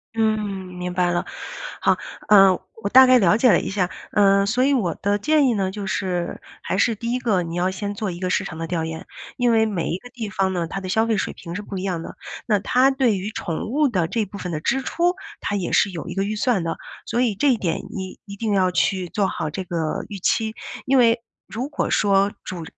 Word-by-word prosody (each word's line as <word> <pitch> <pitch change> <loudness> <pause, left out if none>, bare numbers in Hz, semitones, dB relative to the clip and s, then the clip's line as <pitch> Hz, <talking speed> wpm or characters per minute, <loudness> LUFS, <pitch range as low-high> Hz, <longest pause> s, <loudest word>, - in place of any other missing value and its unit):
嗯， 220 -1 +2 0.4
明 180 0 -4
白 180 0 +2
了。 175 - -1 0.6
好， - - +3 0.3
呃， 195 -2 +8 0.3
我 200 - -2
大 260 +4 +9
概 255 -1 +6
了 195 -1 +4
解 245 +3 +4
了 175 - +5
一 - - -4
下。 190 -3 0 0.2
嗯， 200 -1 +4
所 245 +5 +2
以 280 +2 +3
我 205 -11 0
的 205 +1 +2
建 300 +4 +3
议 245 - +3
呢， 195 -3 0
就 200 +1 -5
是， 185 -2 -2 0.2
还 - - -2
是 225 +3 +2
第 230 +3 -4
一 250 - 0
个 205 -7 +1
你 165 0 -5
要 180 +1 +1
先 200 +2 -4
做 205 0 -3
一 175 -1 -6
个 185 0 -2
市 195 - +1
场 170 -4 -7
的 165 - -3
调 165 -1 -2
研， 160 0 -6 0.3
因 245 -1 +2
为 220 -1 +4
每 195 -6 -2
一 170 - -1
个 245 +6 -13
地 225 -4 -5
方 190 -1 0
呢， 175 -2 -1
它 185 +4 -5
的 190 - -6
消 220 +4 +2
费 225 -2 +1
水 - - -2
平 170 - -9
是 205 - -3
不 200 -1 -7
一 185 - -4
样 180 -4 -2
的。 - - -8 0.3
那 215 -3 +3
它 255 +7 +3
对 260 -6 +2
于 195 +3 -4
宠 170 -1 -4
物 290 +3 +2
的 180 -8 0
这 225 +6 0
部 200 +1 -9
分 180 -2 -5
的 155 - -3
支 270 +10 +1
出， 345 +6 +1 0.3
它 205 - -1
也 185 - -3
是 205 - +4
有 170 -4 -6
一 - - -5
个 195 - 0
预 210 +2 -2
算 215 -5 +1
的， 165 - -3 0.3
所 235 - -1
以 240 -5 +2
这 285 +8 +2
一 245 - +2
点 170 -6 -1
你 190 -1 -6
一 200 -1 -9
定 215 0 -1
要 185 -2 +3
去 180 +1 0
做 200 +1 +1
好 155 - -3
这 185 +5 -5
个 165 -3 -2
预 205 -2 -7
期。 220 +4 0 0.3
因 270 +1 +3
为 230 -1 +4 0.3
如 240 +5 -3
果 290 - -2
说 200 -1 +3
主 180 -3 -5
200 Hz, 270 characters per minute, -22 LUFS, 180-230 Hz, 0.6 s, 大